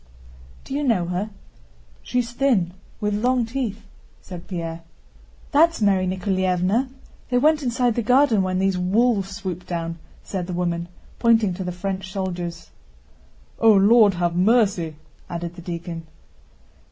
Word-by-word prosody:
"Do - - -8
you 290 +1 -1
know 225 -10 +2
her? 185 +4 -2 0.7
She's 245 -1 -1
thin, 240 -10 +1 0.3
with 210 0 -1
long 245 +3 +1
teeth," 225 -3 -4 0.4
said 180 -3 -10
Pierre. 165 -2 -5 0.7
"That's 330 +2 +4
Mary 195 -3 +2
Nikoláevna! 185 +5 0 0.4
They 250 - +2
went 305 +4 +4
inside 245 -2 +1
the 235 - -1
garden 245 -2 +4
when 185 -1 -1
these 190 -1 +1
wolves 195 +1 +1
swooped 185 -4 -6
down," 165 -1 -4 0.2
said 185 -3 -4
the 180 - -4
woman, 170 -1 -1 0.3
pointing 225 -5 +3
to 190 +2 -5
the 180 - -3
French 190 +1 -4
soldiers. 175 -3 -4 0.9
"O 225 - +6
Lord, 205 0 +6
have 175 -1 0
mercy!" 190 -5 +2 0.3
added 170 0 -4
the 175 - -11
deacon. 170 -1 -6
195 Hz, 140 wpm, -23 LUFS, 175-230 Hz, 0.9 s, O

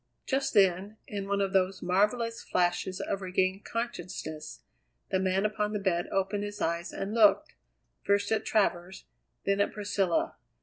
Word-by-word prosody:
Just 270 0 -1
then, 195 +1 +3
in 200 -1 -5
one 200 0 +1
of 195 0 -1
those 190 0 +1
marvellous 210 +6 +1
flashes 180 +1 0
of 195 - -2
regained 185 +1 0
consciousness, 180 -9 -5 0.5
the 190 - +2
man 190 +1 +1
upon 210 0 -1
the 210 - -1
bed 175 -3 0
opened 195 +1 0
his 205 0 -6
eyes 170 +1 -1
and 195 +2 -4
looked, 230 +7 +4 0.5
first 200 +1 +1
at 220 - +2
Travers, 190 -3 0 0.4
then 200 0 +2
at - - +1
Priscilla. 200 -4 0
195 Hz, 150 wpm, -29 LUFS, 185-210 Hz, 0.5 s, looked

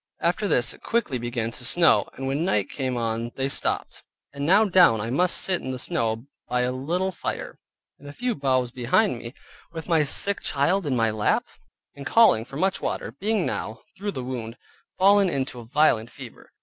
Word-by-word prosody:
After 180 +5 0
this 120 -8 +2
it - - -17
quickly 215 - -1
began 120 -1 -3
to 120 - -8
snow, 165 +6 +3
and 135 - -6
when 140 +4 -1
night 105 - 0
came 130 -3 -3
on, 115 0 -2
they 135 0 -1
stopped, 135 - -2 0.3
and 140 0 -5
now 205 +5 +5
down 180 - +5
I 115 +3 -3
must 180 +7 +3
sit 185 -2 +2
in 130 - -6
the 130 - -3
snow, 115 -1 -2 0.2
by 125 0 0
a 125 0 0
little 170 +9 -2
fire, - - -5 0.4
and 145 - -11
a - - -7
few 245 +10 -2
boughs 130 - 0
behind 130 - +1
me, 120 +3 -9 0.4
with 160 -1 -7
my 165 -3 +3
sick 200 +8 0
child 160 +6 +1
in 135 - 0
my 115 -2 +2
lap; 105 -1 +1 0.5
and 140 - -10
calling 140 - +4
much 190 +8 0
for - - -17
water, - - -3
being 210 -1 -1
now 110 +1 -4
(through 200 +1 -4
the 130 - -5
wound) 120 -3 -6 0.4
fallen 200 0 +5
into 135 -5 -3
a 120 - -10
violent 120 -3 +2
fever. 125 -3 -12
135 Hz, 200 wpm, -24 LUFS, 120-180 Hz, 0.5 s, now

